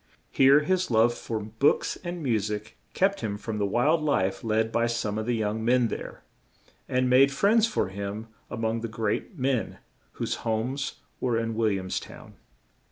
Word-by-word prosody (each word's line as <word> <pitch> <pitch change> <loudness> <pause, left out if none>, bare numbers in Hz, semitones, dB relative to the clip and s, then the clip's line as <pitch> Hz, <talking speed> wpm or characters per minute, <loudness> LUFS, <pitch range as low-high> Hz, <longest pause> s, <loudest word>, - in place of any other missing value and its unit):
Here, 135 +2 +6
his 185 +4 0
love 115 0 +4
for 115 -1 -4
books 110 +6 +1
and 175 -2 -5
mu 120 -5 +2
sic 105 +1 -5 0.2
kept 195 +1 +2
him 105 -3 -2
from 105 0 -4
the 100 - +1
wild 145 +10 +2
life 95 -11 0
led 110 0 +1
by 115 +1 +2
some 110 -3 -2
of 110 - -4
the 120 - +1
young 110 0 -1
men 120 0 +3
there, - - -7 0.7
and 125 0 +1
made 130 +2 +5
friends 210 +10 +3
for 215 - -1
him 100 +3 -5 0.2
a 125 - -5
mong 115 0 -1
the 115 - -3
great 110 - -3
men, 130 -3 -1 0.4
whose - - -3
homes 125 +6 -2 0.2
were 120 -3 0
in 115 0 -1
Wil 110 0 +2
liams 95 -1 -3
town. - - -12
115 Hz, 180 wpm, -27 LUFS, 110-135 Hz, 0.7 s, Here